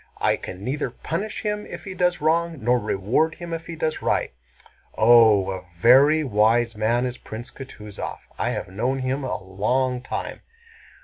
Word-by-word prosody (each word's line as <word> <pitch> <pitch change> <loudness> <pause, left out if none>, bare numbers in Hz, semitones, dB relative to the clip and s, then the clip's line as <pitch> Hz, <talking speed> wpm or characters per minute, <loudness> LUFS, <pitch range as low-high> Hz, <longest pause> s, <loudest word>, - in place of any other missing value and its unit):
"I - - +2
can 95 +1 -8
neither 135 +3 -2
punish 180 - -4
him 210 -1 -2
if - - -8
he 195 - -6
does 180 -2 +1
wrong 165 +1 +1
nor 125 +1 +2
reward 120 +12 0
him 170 -1 -7
if 165 0 -5
he 170 - -6
does 160 -1 -2
right." - - 0 0.6
"Oh, 110 -4 +6
a 95 -1 -6
very 135 - +5
wise 115 -1 +2
man 115 +3 +1
is 125 0 -4
Prince 115 +3 -8
Kutúzov! 105 -6 -8 0.2
I - - 0
have - - -3
known 120 +8 -1
him 130 +2 -2
a 130 - -3
long 125 +7 0
time!" 130 - -5
125 Hz, 170 wpm, -23 LUFS, 110-155 Hz, 0.6 s, Oh